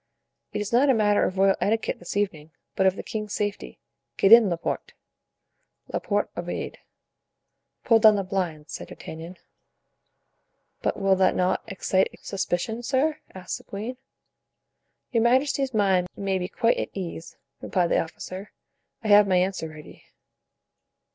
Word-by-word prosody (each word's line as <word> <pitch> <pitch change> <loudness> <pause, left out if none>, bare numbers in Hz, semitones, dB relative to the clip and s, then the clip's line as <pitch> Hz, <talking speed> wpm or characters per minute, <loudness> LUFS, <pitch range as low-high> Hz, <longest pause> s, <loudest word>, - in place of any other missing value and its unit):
"It - - -3
is 210 +2 -5
not 270 +4 +4
a 265 - +5
matter 210 -2 +3
of 185 - -3
royal 195 0 +4
etiquette 220 +2 0
this 175 +3 -5
evening, 160 -7 -2 0.3
but 190 - +3
of 190 - +2
the - - -6
king's 215 -2 -5
safety. 205 -1 -3 0.4
Get 195 - +3
in, 230 -3 +9
Laporte." 170 -1 -3 1.0
Laporte - - -1
obeyed. - - -5 1.0
"Pull 230 -2 +5
down 215 -1 +7
the 200 - -1
blinds," 180 -5 -3
said - - -6
D'Artagnan. 165 +3 -9 1.4
"But - - -1
will 195 -1 +3
that 185 0 +3
not 180 0 +1
excite 190 -2 0
suspicion, 195 +3 -2
sir?" 270 +5 0 0.2
asked 185 -1 -5
the - - -17
queen. 220 +6 -6 1.1
"Your 230 -3 +2
majesty's 265 +3 +2
mind 195 -5 +2
may 195 -1 -1
be 180 - -3
quite 230 +4 +1
at - - -2
ease," 170 -3 -6 0.2
replied 175 -2 0
the - - +4
officer; 185 +4 -8 0.5
"I 215 - -2
have 205 0 +7
my 185 -1 +3
answer 180 -3 0
ready." 155 -1 -13
195 Hz, 150 wpm, -25 LUFS, 185-220 Hz, 1.4 s, in